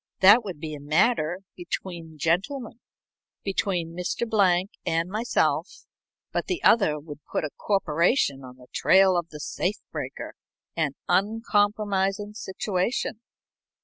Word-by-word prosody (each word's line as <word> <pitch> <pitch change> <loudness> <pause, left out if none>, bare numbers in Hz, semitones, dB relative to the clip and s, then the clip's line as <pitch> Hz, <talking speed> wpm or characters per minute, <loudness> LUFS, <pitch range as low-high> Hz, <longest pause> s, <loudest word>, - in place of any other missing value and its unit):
That 205 +5 +8
would 185 -7 -6
be 155 0 -5
a 150 - -6
matter 160 +4 +1
between 170 -3 -6
gentlemen, 195 - -1 0.6
between 180 -4 -1
Mr. 180 +6 -2
Blank 190 -3 +3
and 165 +2 0
myself, 225 +4 0 0.5
but - - -2
the 365 -3 -2
other 180 -10 +4
would 145 -1 -10
put - - 0
a 150 - -3
corporation 170 - +1
on 125 0 -11
the 125 - -15
trail 190 -1 +5
of 170 -1 -1
the 150 - -9
safe 180 +6 -2
breaker - - -5 0.4
an 155 -4 0
uncompromising 205 0 +1
situation." 205 +3 -2
185 Hz, 125 wpm, -26 LUFS, 160-210 Hz, 0.6 s, That